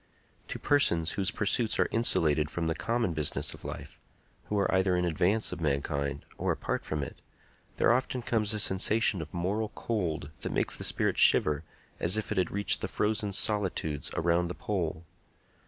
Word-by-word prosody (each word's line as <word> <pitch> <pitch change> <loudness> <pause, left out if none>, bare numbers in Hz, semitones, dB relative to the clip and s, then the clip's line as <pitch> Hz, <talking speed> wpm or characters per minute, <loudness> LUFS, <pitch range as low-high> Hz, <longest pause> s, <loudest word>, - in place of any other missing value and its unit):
To - - -5
persons 85 - +2
whose 95 -2 0
pursuits 110 +3 +1
are - - +3
insulated 80 -10 +2
from 85 0 -3
the 80 - +1
common 115 0 -1
business 75 -2 -1
of - - -13
life—who 105 - -8
are 100 -1 +1
either 95 -1 +3
in 90 - +1
advance 90 +6 +1
of - - -6
mankind 70 -1 -1
or - - 0
apart - - -2
from 75 -2 -3
it—there 95 - -3
often 125 0 -1
comes 110 -3 +1
a 105 - 0
sensation 105 0 +2
of 80 - -8
moral 100 +5 -1
cold 85 -10 -2
that - - -4
makes - - 0
the - - -6
spirit - - +1
shiver 75 0 +5 0.4
as 90 +5 +3
if 110 - -3
it 105 - +1
had 90 - +1
reached 100 +1 +2
the - - -2
frozen 105 -1 -1
solitudes 95 -8 0
around 85 +1 +2
the 90 - -5
pole. 85 -5 -3
95 Hz, 170 wpm, -29 LUFS, 80-105 Hz, 0.4 s, shiver